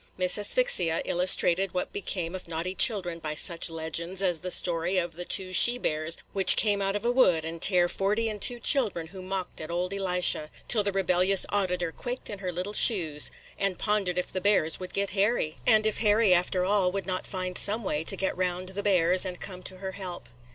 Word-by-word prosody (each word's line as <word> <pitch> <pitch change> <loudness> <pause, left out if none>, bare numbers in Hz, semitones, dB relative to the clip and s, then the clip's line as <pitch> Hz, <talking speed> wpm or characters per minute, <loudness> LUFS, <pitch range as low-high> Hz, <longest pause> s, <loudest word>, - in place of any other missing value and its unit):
Miss 185 -1 +2
Asphyxia 210 - +2
illustrated 180 +1 +2
what 180 - -3
became 180 -4 -4
of 185 -2 -8
naughty 170 +2 -4
children 185 -5 +2
by 155 -1 -5
such 170 +2 +2
legends 165 +3 -4
as 175 -4 +1
the 180 - -6
story 175 +1 0
of 175 -2 -2
the 175 +2 -7
two 185 0 -1
she 240 +6 +6
bears 155 -6 -2 0.2
which 190 -2 +6
came 205 -2 +2
out 195 0 -1
of 205 - -4
a 240 - +2
wood 180 -11 +2
and 165 0 -7
tare 180 -3 +4
forty 210 +5 -1
and 210 -2 -5
two 240 -1 +2
children 220 - +1
who 190 - -9
mocked 185 -2 -6
at 155 - -8
old 180 +2 -3
Elisha, 180 -5 0 0.2
till 220 - +4
the 200 - -1
rebellious 190 0 +2
auditor 180 -4 -2
quaked 245 +7 -6
in 205 - -8
her 185 -2 -4
little 180 +4 -5
shoes, 165 -10 +3 0.3
and 195 -2 -1
pondered 205 -4 -1
if 180 - -2
the 185 - -3
bears 195 -5 +1
would 185 -1 -8
get 200 0 -2
Harry, 195 -5 -1
and 215 -2 +4
if 220 - -1
Harry, 210 -2 +3
after 180 +1 0
all, 195 -2 +1
would 195 -1 -4
not 185 0 -4
find 185 -2 -5
some 215 +5 +2
way 155 -5 -3
to - - +1
get 195 - -2
round 180 0 -3
the 195 +2 -4
bears 185 -2 +3
and 180 -2 -4
come 185 -2 -8
to 185 0 -6
her 190 0 -6
help. 185 -6 -9
185 Hz, 215 wpm, -26 LUFS, 175-200 Hz, 0.3 s, she